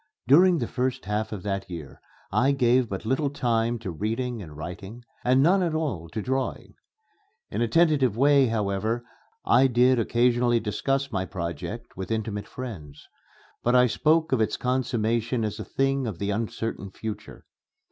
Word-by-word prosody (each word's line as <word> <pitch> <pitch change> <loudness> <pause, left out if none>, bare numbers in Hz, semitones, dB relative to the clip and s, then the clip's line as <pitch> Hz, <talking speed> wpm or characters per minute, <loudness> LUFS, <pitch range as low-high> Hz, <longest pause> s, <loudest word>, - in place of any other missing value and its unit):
During 175 +6 +6
the 120 -6 -2
first 130 -3 -2
half 105 +2 -2
of 100 -4 -6
that 100 -1 -3
year 80 -6 -8 0.3
I 135 +3 +3
gave 125 -2 +3
but 95 +2 -5
little 135 +5 +1
time 120 -4 0
to 110 -5 -6
reading 115 +6 -3
and 75 -5 -10
writing, 95 +8 -8 0.2
and 130 +2 +4
none 185 +5 +4
at 170 -3 0
all 115 - -2
to 105 +6 -4
drawing. 130 0 -3 0.8
In - - -2
a 120 - +2
tentative 140 - +3
way, 140 0 +5
however, 110 +2 -1 0.4
I 135 +2 +5
did 125 0 +4
occasionally 120 +1 +2
discuss 135 +6 -1
my 95 -4 -1
project 85 -4 -6
with 95 0 -6
intimate 110 -2 -3
friends; 85 - -8 0.5
but 120 +1 +2
I 125 0 +6
spoke 160 +7 +2
of 130 -4 +2
its 110 - 0
consummation 120 -2 0
as 105 - -4
a - - -3
thing 135 +3 0
of 105 -6 -4
the 100 +2 -2
uncertain 110 -1 -3
future. 110 +2 -8
120 Hz, 165 wpm, -26 LUFS, 105-130 Hz, 0.8 s, During